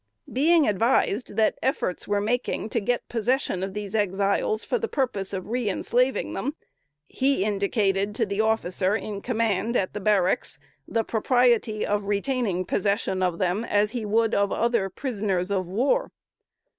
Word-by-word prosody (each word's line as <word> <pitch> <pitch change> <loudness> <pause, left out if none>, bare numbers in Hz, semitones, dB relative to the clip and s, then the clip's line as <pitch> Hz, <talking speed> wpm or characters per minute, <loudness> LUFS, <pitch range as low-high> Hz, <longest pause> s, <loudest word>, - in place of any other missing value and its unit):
Being 315 +4 +4
advised 225 +2 +1
that 220 -1 +2
efforts 260 - -1
were 205 0 +1
making 225 0 -1
to 230 - 0
get 240 +3 -1
possession 240 -4 0
of 190 +1 -4
these 205 -2 -5
Exiles 200 +1 0
for - - -1
the 455 - -2
purpose 240 - -2
of 190 -2 -3
reënslaving 245 +3 0
them, 285 +4 -3 0.5
he 270 -6 +1
indicated 200 -1 0
to 225 - +1
the 200 +1 -1
officer 205 -3 +1
in 210 -2 -4
command 230 -1 0
at 185 - -1
the 210 - -4
barracks 190 -3 +1 0.3
the 225 - 0
propriety 235 -2 +2
of 205 0 -1
retaining 205 -2 -1
possession 200 0 0
of 180 -2 0
them 185 +4 0
as 210 -2 +1
he 240 -2 -3
would 225 +2 +1
of 200 0 +2
other 230 -4 +1
prisoners 200 -5 -2
of 185 -3 -1
war. 265 - +1
210 Hz, 155 wpm, -25 LUFS, 195-240 Hz, 0.5 s, Being